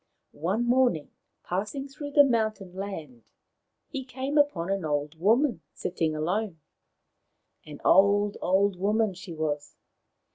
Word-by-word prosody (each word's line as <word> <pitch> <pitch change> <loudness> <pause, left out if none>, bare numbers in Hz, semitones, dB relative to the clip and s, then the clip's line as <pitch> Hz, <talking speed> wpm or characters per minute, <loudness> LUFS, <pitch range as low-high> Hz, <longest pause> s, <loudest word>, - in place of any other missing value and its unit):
One 190 +10 -1
morning, 240 - +2 0.3
passing 210 +10 -3
through 285 +1 -8
the 290 - +8
mountain 215 -7 0
land, 165 - -7 0.6
he 275 -3 -5
came 265 +3 -4
upon 195 - +2
an 195 -2 -1
old 150 -1 -1
woman, 225 - +3
sitting 160 -3 -2
alone. 180 +3 -2 1.1
An 150 -1 -9
old, 200 +2 +5
old 195 +1 +2
woman 210 +2 +1
she 185 0 -10
was. 150 -2 -3
195 Hz, 120 wpm, -27 LUFS, 165-240 Hz, 1.1 s, the